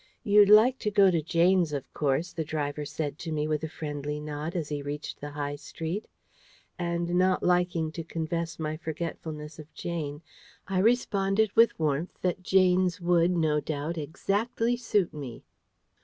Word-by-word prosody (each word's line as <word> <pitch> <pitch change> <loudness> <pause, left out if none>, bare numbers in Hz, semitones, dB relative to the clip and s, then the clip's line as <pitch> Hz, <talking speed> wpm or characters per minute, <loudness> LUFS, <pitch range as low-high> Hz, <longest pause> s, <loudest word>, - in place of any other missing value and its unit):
"You'd 205 -2 +6
like 230 +5 +7
to 210 - -1
go 200 -2 +5
to 165 -2 +1
Jane's, 170 +1 +2
of 140 -2 -5
course," 150 +4 0
the 165 - -2
driver 150 -1 -3
said 145 0 -4
to 165 - -5
me 150 -1 -1
with 155 0 -1
a 160 - -3
friendly 150 -1 -4
nod 150 +2 -5
as 160 -4 -2
he 145 -1 -3
reached 145 +1 -6
the 145 - -5
High 145 0 -4
Street: 165 +7 -5 0.7
and 170 0 -1
not 185 +1 +2
liking 175 -3 +1
to 165 +1 -6
confess 165 +1 -3
my 155 -1 -3
forgetfulness 160 -1 -6
of 155 0 -11
Jane, 155 -3 -4 0.4
I 190 -1 0
responded 205 -2 +2
with 230 +1 +5
warmth 155 +2 -1
that 185 0 0
Jane's 185 0 +3
would, 175 -1 +3
no 160 -4 +2
doubt, 155 +2 -3
exactly 220 - -1
suit 210 -6 0
me. 135 -6 -7
165 Hz, 165 wpm, -28 LUFS, 150-185 Hz, 0.7 s, like